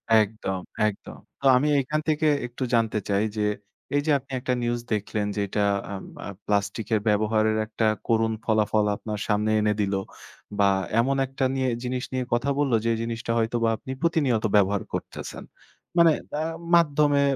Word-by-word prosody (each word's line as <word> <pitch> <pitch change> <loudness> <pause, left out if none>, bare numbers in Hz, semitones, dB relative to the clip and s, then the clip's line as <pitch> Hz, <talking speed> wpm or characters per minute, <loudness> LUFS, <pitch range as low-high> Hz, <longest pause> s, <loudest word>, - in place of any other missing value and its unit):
একদম, 105 -3 +1 0.3
একদম। 105 - -6 0.2
তো - - -6
আমি 145 +4 +1
এখান 150 +4 -1
থেকে 155 0 +2 0.2
একটু 125 +2 -5
জানতে 110 -2 +2
চাই 100 +1 +2
যে, 105 - 0 0.5
এই 145 - +3
যে - - +4
আপনি 135 +1 -19
একটা 125 0 -1
নিউজ 120 0 -1
দেখলেন 105 0 -1
যে, - - -2
এটা 105 +2 -1 0.3
আ - - -4 0.3
আব 100 - -7
প্লাস্টিকের 105 +2 0
ব্যবহারের 110 +1 +2
একটা 110 +1 -2 0.2
করুণ 115 -1 +2
ফলাফল, 110 -1 +2
আপনার 105 0 -5
সামনে 105 0 +1
এনে 105 0 +2
দিল। 100 -1 0 0.7
বা 100 -1 +5 0.3
এমন 135 +4 +2
একটা 135 0 -2
নিয়ে, 130 -1 +1
জিনিস 125 0 -2
নিয়ে 130 - 0
কথা 120 +4 +1
বললো, 135 -5 +2
যে 115 - +3
জিনিসটা 115 0 -3
হয়তোবা 115 0 +1
আপনি 130 - -8
প্রতিনিয়ত 145 -9 +1
ব্যবহার 100 0 +3
করতেছেন। - - -6 0.5
মানে 170 -1 +7 0.3
আ - - 0 0.3
মাধ্যমে 145 -3 +4
115 Hz, 160 wpm, -25 LUFS, 105-130 Hz, 0.7 s, মানে